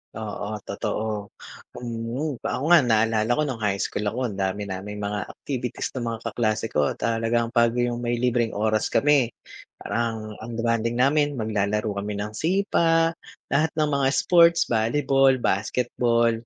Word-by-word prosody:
Oo, 105 0 -5
totoo, 105 0 -3 0.5
mm. 120 +4 -4
Ako 130 - -3
nga 175 - +9
naalala 110 -3 +2
ko 150 - +1
no'ng 130 -6 -3
high 105 -3 0
school 105 +1 -2
ako, 120 +2 -2
ang 100 - -8
dami 95 +1 -1
naming 100 +1 -6
mga 100 -1 -3
activities 125 -4 -4
nung 120 -3 -4
mga 115 - -6
kaklase 110 -1 -1
ko. 75 -1 +1
Talagang 115 0 0
'pag 120 0 +3
yung 120 -1 0
may 120 0 -1
libreng 120 -1 0
oras 110 +1 +1
kami, 145 -4 +3 0.5
parang 115 -2 -3
ang 115 +1 -7
bonding 115 0 0
namin 145 +3 +2
maglalaro 105 -1 -1
kami 105 +1 -4
ng 105 - -6
sipa, 165 - +2 0.4
lahat 155 +3 +2
ng 155 -1 +1
mga 140 -1 +2
sports, 170 -1 +5
volleyball, 135 +4 +3
basketball, 115 +3 +1
115 Hz, 150 wpm, -24 LUFS, 110-130 Hz, 0.5 s, nga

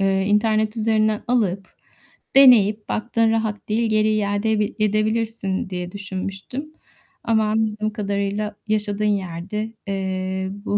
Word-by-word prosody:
ııı, 195 0 +2
internet 215 +2 +1
üzerinden 215 -1 +1
alıp, 200 -6 0 0.7
deneyip, 215 -6 +6
baktın 225 0 +1
rahat 220 -2 -2
değil, 225 +1 +1
geri 215 0 +3
iade 210 +1 0
bi 210 - -1
edebilirsin 215 -2 0
diye 180 -1 -5
düşünmüştüm. 195 +9 -6 0.5
Ama 220 -1 +2
anladığım 215 0 -1
kadarıyla 205 0 -2
yaşadığın 210 -1 0
yerde, 200 +2 -2
eee, 190 -1 -2 0.2
bu 205 - +1
210 Hz, 115 wpm, -22 LUFS, 195-220 Hz, 0.7 s, deneyip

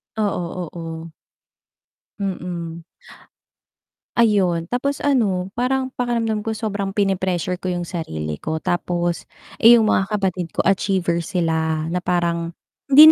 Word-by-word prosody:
Oo, 180 -5 -2
oo. 165 -1 -6 1.1
Mm. 175 -3 -4 1.3
Ayun, 185 -7 +3
tapos 275 +3 -1
ano, 200 -10 +1
parang 260 +1 0
pakiramdam 230 -4 0
ko 220 -1 -1
sobrang 200 -3 -3
pini-pressure 185 -3 0
ko 185 - -5
yung 175 0 -2
sarili 80 - -4
ko 160 - -3
tapos, 175 -1 -1 0.3
eh, 235 +2 +9
yung 220 -2 +4
mga 190 - +2
kapatid 185 -4 -1
ko - - +3
achiever 185 -2 +2
sila 160 -2 0
na 180 - 0
parang 170 -1 0 0.3
hindi 300 +3 +10
185 Hz, 120 wpm, -21 LUFS, 170-215 Hz, 1.3 s, hindi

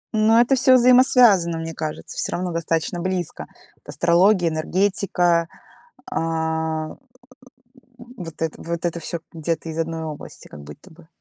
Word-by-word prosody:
Ну, 220 +1 +4
это 245 +3 +3
всё 255 0 +5
взаимосвязано, 245 -9 +5
мне 165 0 -5
кажется, 155 -1 -6
всё - - -2
равно 180 0 -2
достаточно 165 +1 -2
близко. 185 -2 -3 0.4
Астрология, 175 +1 +2
энергетика, 175 0 0 0.6
а, 160 -3 -2 1.1
вот 235 -11 -11
это 160 -1 -3
вот 170 0 -5
это 170 0 -2
всё 170 +1 -5
где-то 165 0 -3
из 160 - -6
одной 165 0 -3
области, 155 -2 -9
как 75 - -12
будто 75 +1 -13
бы. 160 0 -18
170 Hz, 135 wpm, -22 LUFS, 160-195 Hz, 1.1 s, всё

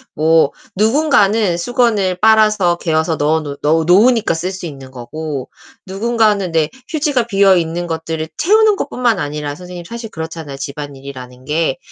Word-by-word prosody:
뭐 160 -1 +3 0.2
누군가는 220 - +2
수건을 205 -1 +1
빨아서 215 -5 +4
개어서 160 -1 0
넣어 155 +2 +1
놓 145 -2 -7
넣어 160 +2 +2
놓으니까 220 +4 +4
쓸 165 +3 -3
수 190 -2 -7
있는 135 -4 -9
거고. 135 +2 -6 0.4
누군가는 210 -2 0
내 160 -2 +1 0.2
휴지가 290 -7 0
비어 195 -3 +4
있는 170 +1 -2
것들을 160 -1 -4
채우는 430 +4 +4
것뿐만 240 - 0
아니라 145 -1 -4
선생님 180 0 -9
사실 230 +2 -7
그렇잖아요, 160 -4 -7
집안일이라는 135 -3 -8
게. 150 -2 0
170 Hz, 350 characters per minute, -16 LUFS, 155-215 Hz, 0.4 s, 빨아서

